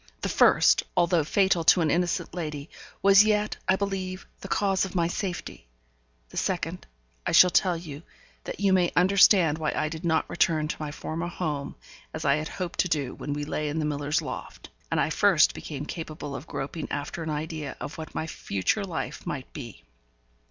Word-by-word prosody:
The -, -, -1 dB
first, -, -, +5 dB, 0.2 s
although 170 Hz, -2 st, +3 dB
fatal 190 Hz, +1 st, +2 dB
to 175 Hz, -, +6 dB
an 155 Hz, -3 st, +2 dB
innocent 175 Hz, -1 st, 0 dB
lady, 150 Hz, -4 st, -5 dB, 0.3 s
was 200 Hz, +1 st, +8 dB
yet, 210 Hz, 0 st, +1 dB
I 185 Hz, -, +6 dB
believe, 190 Hz, -1 st, -3 dB
the -, -, -8 dB
cause 195 Hz, -1 st, +1 dB
of 190 Hz, 0 st, -5 dB
my 170 Hz, -2 st, +2 dB
safety; 175 Hz, -, -5 dB, 0.6 s
the -, -, -10 dB
second -, -, -2 dB, 0.4 s
I -, -, -2 dB
shall 180 Hz, -, +8 dB
tell 180 Hz, -2 st, +3 dB
you, 155 Hz, -3 st, -8 dB, 0.4 s
that -, -, -6 dB
you 200 Hz, -1 st, +3 dB
may 180 Hz, -2 st, +3 dB
understand 180 Hz, -3 st, +5 dB
why 155 Hz, -2 st, -1 dB
I 155 Hz, -, 0 dB
did 160 Hz, +2 st, -7 dB
not 160 Hz, -2 st, +1 dB
return 155 Hz, -2 st, +1 dB
to -, -, -3 dB
my 150 Hz, -1 st, -4 dB
former 165 Hz, +3 st, -4 dB
home, 150 Hz, -5 st, -4 dB, 0.4 s
as 160 Hz, -, -5 dB
I 140 Hz, 0 st, +4 dB
had 155 Hz, +1 st, -3 dB
hoped 180 Hz, 0 st, -6 dB
to -, -, +3 dB
do 145 Hz, -6 st, -1 dB
when 145 Hz, -, -5 dB
we 145 Hz, 0 st, -3 dB
lay 150 Hz, 0 st, -2 dB
in 150 Hz, -, -3 dB
the 155 Hz, -, 0 dB
miller's 150 Hz, +2 st, -1 dB
loft, -, -, -7 dB, 0.2 s
and -, -, 0 dB
I -, -, +1 dB
first -, -, +4 dB
became 145 Hz, -1 st, -6 dB
capable 150 Hz, -3 st, -6 dB
of 140 Hz, -, -8 dB
groping 150 Hz, +4 st, -5 dB
after 145 Hz, +3 st, -4 dB
an 160 Hz, -, -4 dB
idea 155 Hz, -2 st, -4 dB
of 155 Hz, -, -7 dB
what 155 Hz, -, -8 dB
my -, -, -2 dB
future 155 Hz, -, -1 dB
life 180 Hz, -4 st, -5 dB
might 135 Hz, -3 st, -5 dB
be. 120 Hz, -, -9 dB
160 Hz, 195 wpm, -27 LUFS, 150-180 Hz, 0.6 s, was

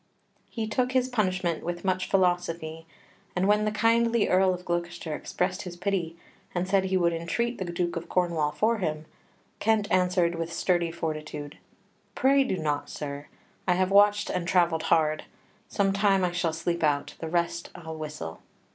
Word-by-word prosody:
He 225 Hz, -2 st, -3 dB
took 250 Hz, +4 st, 0 dB
his 255 Hz, 0 st, +2 dB
punishment 185 Hz, -7 st, 0 dB
with 175 Hz, +2 st, -4 dB
much 185 Hz, -1 st, 0 dB
philosophy, 170 Hz, -3 st, 0 dB, 0.5 s
and 185 Hz, +1 st, +2 dB
when 210 Hz, +1 st, +3 dB
the 215 Hz, -, +1 dB
kindly 230 Hz, +1 st, +3 dB
Earl 185 Hz, 0 st, +4 dB
of 180 Hz, 0 st, -5 dB
Gloucester 175 Hz, -2 st, -3 dB
expressed 185 Hz, +5 st, -2 dB
his 180 Hz, -3 st, -8 dB
pity, 175 Hz, -3 st, -2 dB, 0.4 s
and 180 Hz, +1 st, 0 dB
said 190 Hz, 0 st, +2 dB
he 190 Hz, 0 st, +1 dB
would 170 Hz, -2 st, +2 dB
entreat 235 Hz, +9 st, -2 dB
the 190 Hz, -, -2 dB
Duke 175 Hz, 0 st, -2 dB
of 170 Hz, -, -5 dB
Cornwall 170 Hz, -4 st, +1 dB
for 220 Hz, +6 st, +1 dB
him, 155 Hz, -4 st, -2 dB, 0.5 s
Kent 220 Hz, -1 st, +2 dB
answered 180 Hz, -2 st, +3 dB
with 165 Hz, 0 st, -4 dB
sturdy 175 Hz, 0 st, +1 dB
fortitude: 155 Hz, -3 st, -5 dB, 0.6 s
"Pray 275 Hz, +1 st, +4 dB
do 225 Hz, -8 st, -1 dB
not, 150 Hz, -3 st, -2 dB
sir; 145 Hz, 0 st, -6 dB, 0.4 s
I 180 Hz, -, +5 dB
have 185 Hz, +1 st, +1 dB
watched 205 Hz, +1 st, +5 dB
and 175 Hz, -1 st, -2 dB
travelled 170 Hz, -3 st, +3 dB
hard; 155 Hz, -1 st, +2 dB, 0.4 s
some 195 Hz, -1 st, +1 dB
time 195 Hz, -1 st, +3 dB
I 180 Hz, -, +1 dB
shall 175 Hz, -1 st, 0 dB
sleep 170 Hz, +1 st, -2 dB
out, 145 Hz, -2 st, +1 dB
the 165 Hz, -, -4 dB
rest 170 Hz, 0 st, -1 dB
I'll 160 Hz, -2 st, -7 dB
whistle." 150 Hz, -, -6 dB
180 Hz, 170 wpm, -27 LUFS, 165-195 Hz, 0.6 s, I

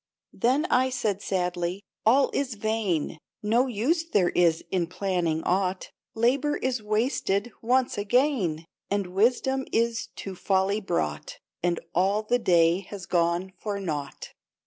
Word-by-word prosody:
Then 265 Hz, +7 st, +2 dB
I 260 Hz, +1 st, +4 dB
said 215 Hz, -6 st, -1 dB
sadly: 180 Hz, 0 st, -2 dB
" -, -, -56 dB
All 265 Hz, +4 st, +5 dB
is 260 Hz, -5 st, -1 dB
vain; 205 Hz, -8 st, -1 dB, 0.2 s
No 235 Hz, +5 st, +3 dB
use 260 Hz, -, 0 dB
there 200 Hz, -, +1 dB
is 170 Hz, -2 st, +2 dB
in 180 Hz, -3 st, +1 dB
planning 180 Hz, -3 st, -1 dB
aught, 185 Hz, 0 st, 0 dB, 0.2 s
Labor 275 Hz, +6 st, +2 dB
is 255 Hz, -3 st, -1 dB
wasted 215 Hz, 0 st, 0 dB
once 245 Hz, -1 st, +1 dB
again, 205 Hz, -, +1 dB, 0.2 s
And 200 Hz, -1 st, 0 dB
wisdom 255 Hz, +6 st, +2 dB
is 230 Hz, 0 st, 0 dB
to 195 Hz, -, -6 dB
folly 190 Hz, +3 st, +1 dB
brought, 75 Hz, -, -2 dB, 0.2 s
And 175 Hz, -1 st, 0 dB
all 195 Hz, +4 st, +2 dB
the 245 Hz, +3 st, +1 dB
day 175 Hz, -4 st, +4 dB
has 200 Hz, -3 st, -7 dB
gone 175 Hz, +2 st, 0 dB
for 205 Hz, -2 st, -3 dB
naught." 150 Hz, -7 st, -5 dB
200 Hz, 140 wpm, -26 LUFS, 180-245 Hz, 0.2 s, All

